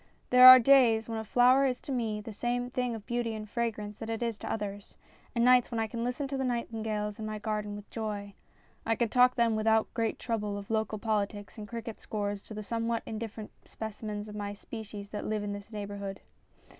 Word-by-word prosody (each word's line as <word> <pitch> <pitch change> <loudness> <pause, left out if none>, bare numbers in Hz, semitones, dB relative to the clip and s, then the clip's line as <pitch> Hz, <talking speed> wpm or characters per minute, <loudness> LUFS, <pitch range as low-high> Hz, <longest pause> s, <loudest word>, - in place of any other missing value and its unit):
There 250 0 +10
are 255 0 +14
days 240 -3 +5
when 225 -1 -3
a - - -4
flower 250 +5 +5
is 255 -2 +1
to - - -7
me 225 -4 -1
the 215 +1 -8
same 245 +3 -2
thing 250 -2 -1
of 215 -2 -9
beauty 240 -2 -2
and 215 0 -6
fragrance 210 -2 -3
that 225 - -6
it 225 +1 -2
is 230 -3 -2
to - - -5
others, 205 -2 -5 0.4
and 235 0 +3
nights 250 -1 +5
when 230 - -2
I 225 - +1
can 230 +1 -4
listen 250 +4 -2
to 275 - -2
the 265 - -1
nightin 235 -3 -2
gales 210 -1 -3
in 220 - -4
my 215 0 -4
garden 210 -1 -3
with 205 0 -9
joy. 205 -3 -4 0.5
I 225 - +1
can 235 -1 0
talk 250 +2 +5
then 235 -2 +2
without 220 0 +2
great 225 -1 -1
trouble 210 -3 -2
of 200 +1 -8
local 220 -1 0
politics 205 0 -2
and 210 - -7
cricket 230 0 -6
scores 205 -1 -3
to 215 - -9
the 215 - -5
somewhat 230 +1 -2
indifferent 220 -1 -6
specimens 210 -1 -6
of 210 - -9
my 205 -1 -4
species 210 -1 -8
that 210 - -5
live 215 -1 -1
in 205 0 -3
this 205 +2 -9
neighbourhood. 200 -2 -6
220 Hz, 220 wpm, -30 LUFS, 210-235 Hz, 0.5 s, are